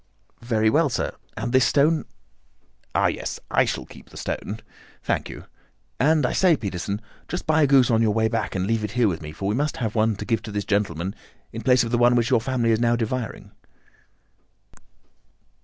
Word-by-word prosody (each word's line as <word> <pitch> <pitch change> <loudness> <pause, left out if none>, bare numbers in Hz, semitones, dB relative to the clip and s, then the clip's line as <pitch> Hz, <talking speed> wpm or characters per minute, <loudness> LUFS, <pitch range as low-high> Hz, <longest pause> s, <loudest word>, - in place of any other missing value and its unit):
"Very 110 -2 +1
well, 155 +2 +3
sir. 115 - -2 0.2
And 120 - -3
this 130 -1 +5
stone?" 155 +3 +3 0.9
"Ah, - - +3
yes, - - -2
I - - +4
shall - - -3
keep - - -15
the - - -13
stone. 105 +3 -4 0.4
Thank - - -1
you. - - -9 0.5
And, 150 0 +3
I - - 0
say, 180 -5 +4
Peterson, 100 0 -4 0.3
just 175 - -4
buy 155 0 +3
a 145 - +5
goose 135 -3 +5
on 115 0 +3
your 110 - +3
way 110 +1 +2
back 110 - -2
and 95 -1 0
leave 115 +1 0
it 105 0 -4
here 120 -2 +3
with 85 -4 -2
me, 75 -1 -7
for 95 +5 -5
we 105 - +1
must 145 +5 -1
have 110 -4 -2
one 110 -1 +2
to - - -6
give 115 -2 0
to 110 - -8
this 100 -1 -3
gentleman 95 -3 -1 0.4
in 115 - -5
place 125 +3 +4
of 115 - -4
the 120 - +2
one 120 0 +5
which 120 +2 +1
your 120 -3 +4
family 120 -2 0
is 110 - +2
now 120 0 +3
devouring." 120 0 -4
115 Hz, 205 wpm, -24 LUFS, 105-130 Hz, 0.9 s, this